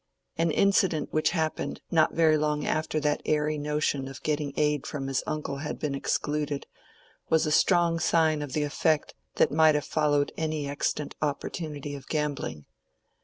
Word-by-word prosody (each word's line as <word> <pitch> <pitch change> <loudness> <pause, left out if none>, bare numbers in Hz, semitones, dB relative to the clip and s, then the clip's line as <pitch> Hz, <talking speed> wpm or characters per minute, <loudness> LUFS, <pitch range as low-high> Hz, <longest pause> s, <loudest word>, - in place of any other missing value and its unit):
An 165 +1 +1
incident 190 -2 +2
which 155 - +2
happened 160 -3 -2
not 160 -2 +3
very 160 -2 +5
long 150 -1 0
after 155 0 0
that 150 0 0
airy 150 0 0
notion 150 -2 -1
of 135 -2 -10
getting 150 -2 -1
aid 150 -2 +1
from 145 -3 -4
his 135 -1 0
uncle 150 -2 -3
had 150 +2 -4
been 150 -2 -2
excluded, 145 +1 -1 0.6
was 160 0 +3
a 155 - -1
strong 170 +1 +3
sign 160 -2 +2
of 145 -3 -5
the 150 - +1
effect 155 +1 0 0.2
that - - +3
might 155 0 +5
have 150 - -1
followed 145 -2 +1
any 155 -2 -2
extant 145 +1 -2
opportunity 145 0 -3
of 140 -1 -9
gambling. 145 - -3
150 Hz, 165 wpm, -27 LUFS, 145-155 Hz, 0.6 s, very